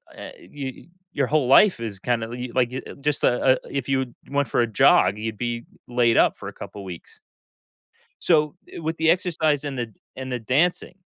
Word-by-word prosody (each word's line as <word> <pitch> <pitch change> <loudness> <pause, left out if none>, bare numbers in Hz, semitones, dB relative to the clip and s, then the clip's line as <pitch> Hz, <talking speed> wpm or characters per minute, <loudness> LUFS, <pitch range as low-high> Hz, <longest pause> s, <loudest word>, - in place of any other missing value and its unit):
eh, - - -9
I - - -16
you 135 -1 -7 0.3
your 140 -3 0
whole 150 -3 +1
life 180 - +6
is 105 -4 -4
kinda 115 0 -1
of 120 - -6
you 125 0 -5
like, 125 -1 +2
you 130 - -4
a - - -9
just 145 +1 -2
a 125 +1 +4
a - - -1
if 140 -2 -3
you'd 130 -3 -1 0.2
went 140 -1 +1
for 115 - +1
a 120 - +1
jog, 105 -1 +4
you'd 110 0 -4
be, 120 0 -3 0.2
laid-up 120 -2 +3
for - - -8
a - - -7
couple 100 - -9
weeks. 90 -3 -10 1.0
So, 150 -3 +3 0.2
i - - -7
with 160 +1 -3
the 160 0 +3
exercise 155 -5 +1
and 140 -3 -4
the 120 -2 -4 0.2
and 130 0 -6
the 125 - -2
dancing, 155 +10 0
130 Hz, 210 wpm, -23 LUFS, 120-145 Hz, 1.0 s, life